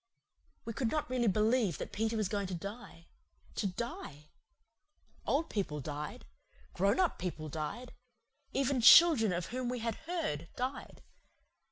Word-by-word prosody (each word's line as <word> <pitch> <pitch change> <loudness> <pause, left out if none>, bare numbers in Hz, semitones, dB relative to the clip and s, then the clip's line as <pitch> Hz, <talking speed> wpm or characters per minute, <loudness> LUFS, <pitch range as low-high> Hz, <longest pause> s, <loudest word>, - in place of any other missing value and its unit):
We 230 - -4
could 240 0 -1
not 305 +2 -1
really 245 -2 +1
believe 215 - +2
that - - -6
Peter 225 +1 -1
was 215 -3 0
going 200 -1 -2
to 185 - -4
die 200 -2 -8 0.5
to 205 - -1
DIE. 180 -7 -6 1.0
Old 310 +4 +1
people 175 -8 -2
died. 150 +1 -6 0.5
Grown 200 - +2
up 365 -2 +1
people 160 -4 -4
died. 160 - -5 0.6
Even 270 -1 +1
children 245 - +8
of 175 -1 -2
whom 255 -1 -2
we 250 - -2
had 230 -1 -2
heard 240 - -2
died. 255 +2 -5
220 Hz, 145 wpm, -33 LUFS, 175-250 Hz, 1.0 s, children